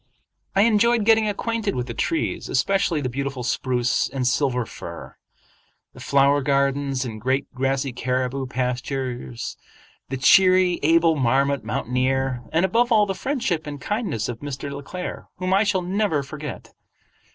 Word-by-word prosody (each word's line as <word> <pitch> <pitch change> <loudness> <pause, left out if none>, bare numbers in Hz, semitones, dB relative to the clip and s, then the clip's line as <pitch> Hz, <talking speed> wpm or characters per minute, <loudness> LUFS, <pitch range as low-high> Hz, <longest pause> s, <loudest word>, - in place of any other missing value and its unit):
I 195 - +5
enjoyed 230 +1 +3
getting 220 -1 +4
acquainted 220 0 -2
with 125 - -2
the 120 - -6
trees, 115 - -2
especially 170 +2 +1
the 130 - -1
beautiful 135 0 -4
spruce 125 -1 0
and 130 -2 -3
silver 125 -1 +1
fir; - - -9 0.8
the - - -14
flower 140 +1 +3
gardens 140 -1 0
and 110 -3 -6
great 130 +3 0
grassy 135 0 -1
caribou 130 +2 -2
pastures; 125 - -3 0.5
the 135 - -3
cheery, 185 +5 +5
able 165 +1 +4
marmot 135 +1 +1
mountaineer; 125 +3 -1
and 165 +3 +3
above 235 +6 +2
all 215 -2 +5
the 195 - -2
friendship 190 - -2
and 145 -1 -6
kindness 205 - -2
of 120 -2 -5
Mr. 140 0 -5
Le 140 0 -6
Claire, 180 +6 -7
whom 185 +1 -1
I 195 +2 +4
shall 195 -3 0
never 185 -5 0
forget. 150 +2 -8
140 Hz, 150 wpm, -23 LUFS, 130-185 Hz, 0.8 s, I